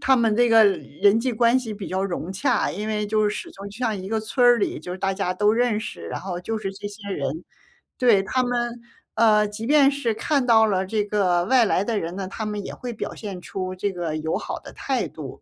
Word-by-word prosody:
他 265 - +4
们 230 -3 +2
这 240 +1 +4
个 225 -1 +7
人 200 +1 +2
际 250 +2 -1
关 235 +2 +3
系 225 -4 -5
比 200 -2 -7
较 190 +1 -1
融 180 -1 -4
洽， 190 - +1
因 210 +4 -5
为 210 -1 -1
就 215 +1 +1
是 - - -1
始 - - -6
终 200 +1 -9
就 205 - -12
像 225 -4 0
一 190 0 -7
个 220 +1 0
村 235 +3 0
儿 245 -1 +6
里 205 - -1
就 170 +4 -7
是 185 - -6
大 195 0 0
家 190 -2 -1
都 205 +3 +3
认 230 -2 +1
识， 85 - -7
然 - - -4
后 180 -2 -5
就 220 +5 -3
是 195 -2 -4
这 195 +1 -8
些 205 0 -10
人。 145 -1 -3 0.5
对， 235 -6 +4
他 255 +6 0
们， 240 -1 -2 0.3
呃， 215 -1 +4
即 210 +2 -7
便 285 +1 +5
是 280 -5 -1
看 275 +4 0
到 225 -2 +6
了 190 -3 0
这 210 +2 0
个 185 -4 +1
外 250 +3 +4
来 195 -2 +1
的 220 0 -1
人 170 +2 -5
呢， 195 -1 -4
他 215 +3 -5
们 210 -1 -4
也 - - -6
会 245 - -6
表 220 - -5
现 200 -4 -6
出 185 0 -5
这 200 +2 -2
个 170 -4 -3
友 160 +1 -1
好 - - -5
的 - - -12
态 - - -2
度。 - - -9
210 Hz, 275 characters per minute, -23 LUFS, 190-230 Hz, 0.5 s, 个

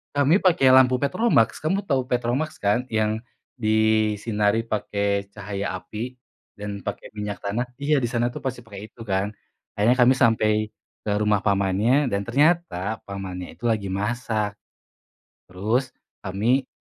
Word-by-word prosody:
Kami 145 +6 +4
pakai 175 -9 +4
lampu 130 0 +5
petromaks, 185 - +2
kamu 190 +6 0
tahu 130 -2 +2
petromaks 125 +6 -1
kan? 105 +5 +1
Yang 110 0 -1 0.3
disinari 110 -1 +2
pakai 100 -2 -1
cahaya 100 -1 -4
api 110 +6 -6 0.4
dan 100 -1 -7
pakai - - -5
minyak 105 -1 -4
tanah. 110 +5 -1 0.2
Iya 150 +1 +2
di 125 - +1
sana 120 0 0
tuh - - -8
masih 130 -2 -3
pakai 105 -2 -10
itu 115 - -14
kan, 100 0 -1 0.4
akhirnya 110 +5 +3
kami 125 +1 +6
sampai 115 -4 +3 0.5
ke 105 - -5
rumah 105 -2 +2
pamannya 100 +8 +2
dan 100 0 0
ternyata 120 - +1
pamannya 95 -2 -5
itu 120 - -8
lagi 105 -4 0
masak. 105 +1 -1 1.0
Terus, 110 +8 0 0.3
kami 115 +8 0
110 Hz, 140 wpm, -24 LUFS, 100-125 Hz, 1.0 s, kami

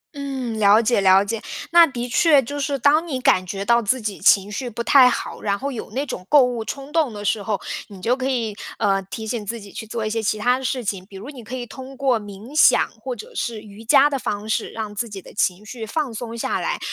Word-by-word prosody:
嗯， 265 -5 -4
了 205 +1 +6
解， 230 -2 +2
了 190 +1 +5
解， 220 +1 -3 0.3
那 340 -1 +8
的 245 -3 -5
确 290 +3 +4
就 285 +5 -5
是 285 -1 -1
当 300 +6 +3
你 270 -5 -2
感 185 -7 +3
觉 195 +2 -4
到 235 +1 +4
自 245 +4 0
己 210 -4 -4
情 200 0 +4
绪 245 +3 -4
不 235 +1 -4
太 255 +1 +7
好， - - -4
然 200 -1 0
后 280 +6 -4
有 240 - -6
那 270 +6 -2
种 185 - -6
购 290 -3 +7
物 245 -2 -1
冲 275 +5 -7
动 310 -5 +1
的 205 0 -7
时 210 - +1
候， 205 0 -2 0.3
你 200 -2 -12
就 235 +7 +1
可 260 0 -2
以， 230 -5 -1 0.2
呃， 195 -2 +1
提 220 +4 -7
醒 220 0 -3
自 230 +3 -5
己 200 -2 -12
去 220 - -8
做 225 0 -3
一 - - -1
些 225 +1 -1
其 215 0 0
它 245 +4 +2
的 - - -8
事 255 -1 -2
情， 195 -2 -3
比 195 - -11
如 215 +8 -9
你 255 -5 -11
可 240 +4 -7
以 245 -1 -5
通 265 +2 -10
过 260 -4 +1
冥 205 +7 -11
想 310 - +5
或 255 +1 -4
者 215 - -11
是 230 -2 -3
瑜 210 0 -13
伽 270 +5 +6
的 280 -2 -2
方 210 -3 -4
式， 220 - -1
让 215 -2 -6
自 230 +3 -3
己 200 -2 -7
的 - - -14
情 195 0 0
绪 225 +1 -8
放 285 0 -2
松 230 +1 -6
下 - - -1
来， - - -2
230 Hz, 280 characters per minute, -22 LUFS, 210-265 Hz, 0.3 s, 那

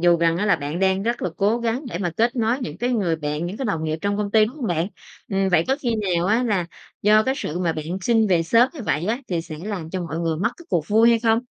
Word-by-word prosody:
dù 175 0 +5
rằng 165 0 +2
á 205 +4 0
là 195 - +4
bạn 145 +2 -4
đang 190 0 +2
rất 235 +3 -2
là 180 - -1
cố 210 +4 +2
gắng 235 +4 -2
để 175 - -4
mà 175 -3 -1
kết 235 +3 +1
nối 230 +2 +1
những 155 -7 -6
cái 245 +3 0
người 195 -9 +1
bạn, 150 +2 -3
những 190 - -5
cái 265 - -4
đồng 165 -8 -1
nghiệp 155 +1 -2
trong 200 0 -1
công 205 -1 -2
ty, 215 0 +5
đúng 235 +7 -6
hông 265 -6 -3
bạn? 170 -2 0 0.4
Ừm, 195 -1 +1
vậy 175 -3 +3
có 265 - +2
khi 240 -4 0
nào 180 -4 0
á 220 +5 +2
là 200 -8 0 0.4
do 215 +1 +5
cái 265 +2 0
sự 160 - -4
mà 175 -3 0
bạn 155 -1 -5 0.2
xin 225 +2 +3
về 175 -4 +3
sớm 230 +9 +4
như 290 - -7
vậy 150 +5 0
á 225 +3 0
thì 175 -3 -1
sẽ 155 -2 -8
làm 190 -7 -5
cho 185 - -3
mọi 165 -1 -4
người 165 -2 -1
mất 215 +8 0
cái 345 - -15
cuộc 170 -5 -1
vui 225 +2 +5
hay 230 - +4
không? 225 -1 +3
195 Hz, 300 wpm, -22 LUFS, 170-225 Hz, 0.4 s, dù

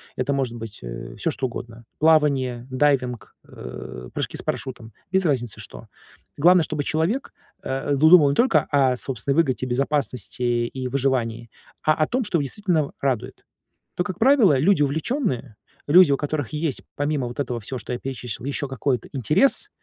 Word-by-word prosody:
это 130 +2 -1
может 130 -4 -1
быть, 115 -2 -7
э, - - -7
всё - - -1
что 130 - -2
угодно 115 -1 -9
плавание, 140 -6 +2
дайвинг, 130 -3 0
э, 60 0 -9
прыжки - - -3
с - - -4
парашютом 120 -4 -5 0.2
без 190 0 +2
разницы, 125 -8 -1
что. - - -11 0.5
Главное, 175 +3 +5
чтобы 150 -1 -3
человек, 165 - -1 0.3
э, 135 +2 -2
ду 155 +3 +5
думал 160 -5 +8
не 140 - 0
только 255 - +3
о 135 -3 +3
собственной 135 +2 -2
выгоде, 135 -5 +1
безопасности 130 -2 -2 0.3
и 130 +1 -5
выживании, 120 -4 -1 0.3
а 155 - +4
о 155 0 +1
том, 255 +1 0
что 200 -5 0
его 145 - 0
действительно 165 -1 -1
радует. 130 -5 -2 0.5
То, 180 - 0
как 180 0 -5
правило, 230 - +5
люди 160 +4 +3
увлечённые, 140 - -2 0.3
люди, 170 0 +7
у 140 - +3
которых 145 -3 -3
есть, 150 -3 -2
помимо 145 -3 -1
вот 120 +4 -8
этого 125 -4 -2
всего, 130 +4 -5
что 125 - -6
я 120 - -4
перечислил, 125 -3 -6
ещё 140 0 -2
какой-то 130 -2 -2
интерес, 150 - +3
140 Hz, 170 wpm, -23 LUFS, 125-155 Hz, 0.5 s, думал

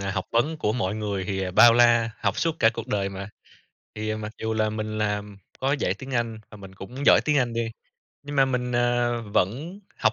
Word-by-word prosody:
à, 100 0 -2
học 95 0 -2
vấn 145 +8 +1
của 105 -8 0
mọi 105 -4 -1
người 105 -3 -3
thì 95 -1 -2
bao 115 +5 +7
la, 120 -1 +4
học - - 0
suốt 165 -1 0
cả 115 - +5
cuộc 115 0 -6
đời 100 -5 -1
mà. 95 +1 -7 0.7
Thì 110 0 -3
mặc 110 0 -6
dù 110 0 -1
là 110 -1 +1
mình 110 0 -4
làm, 105 -1 -2 0.2
có 135 +1 0
dạy 115 -10 0
tiếng 135 +6 -10
Anh 115 -2 -1
và - - -11
mình 95 -2 -12
cũng 125 +9 -7
giỏi - - +7
tiếng 150 -1 +2
Anh 125 -3 0
đi, 115 -1 -2 0.5
nhưng 145 0 -6
mà 135 - +6
mình, 125 -2 -2
ờ, 120 -1 +1
vẫn 125 - -2 0.2
học 110 -2 +3
110 Hz, 225 wpm, -25 LUFS, 105-120 Hz, 0.7 s, bao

